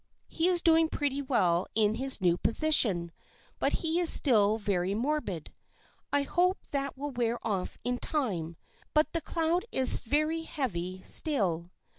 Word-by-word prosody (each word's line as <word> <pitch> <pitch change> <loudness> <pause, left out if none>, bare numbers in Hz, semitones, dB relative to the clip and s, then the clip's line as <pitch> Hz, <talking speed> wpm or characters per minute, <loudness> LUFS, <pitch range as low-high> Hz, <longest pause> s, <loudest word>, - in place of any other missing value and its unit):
He 330 +1 -2
is 355 -2 0
doing 325 -1 +3
pretty 285 -2 -3
well 185 -10 -1
in 215 -1 +1
his 260 -1 -2
new 175 -2 +1
position, 220 - +2 0.5
but - - -1
he 325 +2 -1
is 345 -2 +6
still 215 -6 +4
very 195 -2 -3
morbid. 235 - -4 0.6
I 285 0 0
hope 360 +6 -1
that 275 -2 -4
will 290 +1 -6
wear 240 -2 -3
off 195 -5 -4
in 245 0 -3
time, 180 - -4 0.4
but 305 +1 +1
the 335 - -3
cloud 335 +3 -2
is 260 -1 +8
very 305 +6 -2
heavy 185 - -6
still. 190 - +1
260 Hz, 150 wpm, -27 LUFS, 195-310 Hz, 0.6 s, is